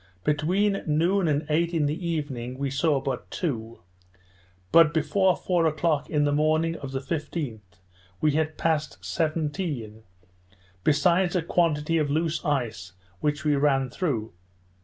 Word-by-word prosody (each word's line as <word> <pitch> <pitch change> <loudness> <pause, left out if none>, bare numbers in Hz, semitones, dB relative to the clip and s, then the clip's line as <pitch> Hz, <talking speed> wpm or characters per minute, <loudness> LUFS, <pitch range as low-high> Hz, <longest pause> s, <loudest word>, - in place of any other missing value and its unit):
Between 185 - +1
noon 170 +5 +2
and 150 0 +1
eight 170 +3 +1
in 155 -3 +2
the 155 +4 -2
evening 130 -6 -3
we 140 0 -2
saw 145 +1 +2
but 130 -2 -4
two; 115 - -4 0.9
but 165 -1 +6
before 180 +4 +2
four 175 -3 +1
o'clock 155 -1 0
in 150 -2 +2
the 145 - +2
morning 155 +3 +2
of 140 -2 -7
the 135 0 -3
15th, 150 -5 -4 0.6
we 155 - +3
had 155 +1 -1
passed 150 - -1
seventeen, 150 - -2 0.8
besides 175 +5 +3
a 175 - +1
quantity 165 -1 +1
of 150 -2 0
loose 160 +2 0
ice 115 - -2 0.3
which 150 +3 -1
we 150 -1 +3
ran 135 -2 +2
through. 120 - -2
150 Hz, 140 wpm, -26 LUFS, 140-165 Hz, 0.9 s, but